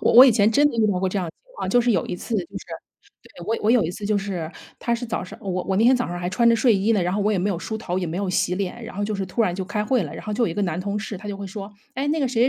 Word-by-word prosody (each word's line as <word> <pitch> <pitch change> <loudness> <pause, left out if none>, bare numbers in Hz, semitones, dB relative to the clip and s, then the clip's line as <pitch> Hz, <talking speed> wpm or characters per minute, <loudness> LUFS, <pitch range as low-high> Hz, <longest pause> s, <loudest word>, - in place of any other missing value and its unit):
我 - - +3
我 250 +2 +11
以 265 - +6
前 215 -1 +4
真 290 +6 +5
的 255 - -5
遇 220 -2 +4
到 185 - 0
过 190 +1 +1
这 195 - -1
样 180 - -2
的 - - -6
情 - - -28
况。 - - -3
就 245 - +5
是 240 0 +2
有 180 -6 +1
一 - - -4
次 230 - -5
就 - - +3 0.2
是 - - -14 0.6
对， 175 - -12
我 225 +1 +1
我 215 - +3
有 235 -6 +4
一 165 - -1
次 205 - -7
就 205 0 +2
是 185 -5 -4 0.3
它 235 - -1
是 235 +1 -4
早 225 - -2
上 180 - -10
我 185 -2 -2
我 190 - 0
那 220 - +4
天 255 - +7
早 245 -1 -1
上 175 0 -4
还 175 0 -2
穿 235 +6 +3
着 230 - +5
睡 230 0 +4
衣 200 +3 +1
呢， 210 - +2
然 180 +2 0
后 210 - 0
我 210 - +2
也 205 - +1
没 185 +3 0
有 195 - 0
梳 220 +4 -4
头 180 -5 -3
也 180 - -2
没 165 - -4
有 195 0 -1
洗 180 0 +1
脸， 200 +4 -4
然 225 - -9
后 205 - -1
就 215 +1 -2
是 195 -1 -2
突 205 +6 0
然 180 -5 +1
就 190 +1 -3
开 210 +2 -2
会 250 -1 +2
了， 150 -3 -6
然 - - -8
后 215 - -3
就 235 - +2
有 - - +1
一 165 - -4
个 205 - 0
男 175 -2 -1
同 200 +2 -2
事， 210 0 -5
他 205 +3 -8
就 200 - -4
会 200 0 -6
说： 200 +1 -7 0.2
“哎， 275 +3 -1
那 310 +2 +1
个 275 - +2
谁 235 -2 +1
205 Hz, 410 characters per minute, -23 LUFS, 185-230 Hz, 0.6 s, 我